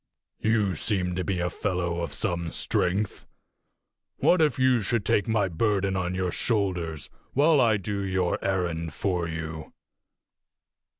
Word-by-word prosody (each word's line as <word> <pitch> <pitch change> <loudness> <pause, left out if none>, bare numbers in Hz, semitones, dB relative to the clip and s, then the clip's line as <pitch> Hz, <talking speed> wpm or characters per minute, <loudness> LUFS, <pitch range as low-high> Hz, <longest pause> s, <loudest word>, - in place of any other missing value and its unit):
You 105 -3 +2
seem 90 +1 -1
to 90 +1 -2
be 95 -1 -1
a 90 - 0
fellow 90 -3 -2
of 85 - -3
some 85 -5 -2
strength. 95 +5 -1 0.9
What 180 -2 +4
if 150 -2 +3
you 130 -2 +3
should 105 0 -1
take 105 - +2
my 110 -3 +2
burden 100 +2 0
on 90 0 -1
your 90 -1 -1
shoulders 90 - -1 0.3
while 145 +1 +5
I 110 -3 +4
do 100 +1 -3
your 95 -2 -1
errand 85 -5 -1
for 90 -4 -1
you?" 80 -1 -6
95 Hz, 140 wpm, -26 LUFS, 85-105 Hz, 0.9 s, while